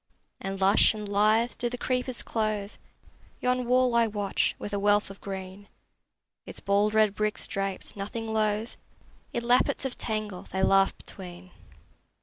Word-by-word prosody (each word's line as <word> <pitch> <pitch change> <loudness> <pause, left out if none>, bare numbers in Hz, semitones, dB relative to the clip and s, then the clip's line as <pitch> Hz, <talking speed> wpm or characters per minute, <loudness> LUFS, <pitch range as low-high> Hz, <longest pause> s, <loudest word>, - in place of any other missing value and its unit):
And 195 0 -4
lush 195 +3 +5
and 210 -1 -5
lithe 215 +4 +3
do 240 - 0
the 245 - -5
creepers 250 0 -2
clothe 215 -2 -1 0.7
Yon 250 -1 0
wall 250 0 +4
I 235 -1 +4
watch, 205 -2 0
with 205 - -6
a 200 - 0
wealth 205 0 +3
of 195 - -13
green: 190 0 -7 0.8
Its - - -8
bald 205 +2 +2
red 215 -2 +4
bricks 215 0 -1
draped, 195 -1 -4
nothing 220 +3 -4
loath, 215 +1 0 0.5
In 235 - -2
lappets 245 +3 +2
of 265 - -4
tangle 215 -4 -4
they 190 +1 -1
laugh 195 0 +4
between. 180 -1 -11
210 Hz, 150 wpm, -28 LUFS, 195-230 Hz, 0.8 s, lush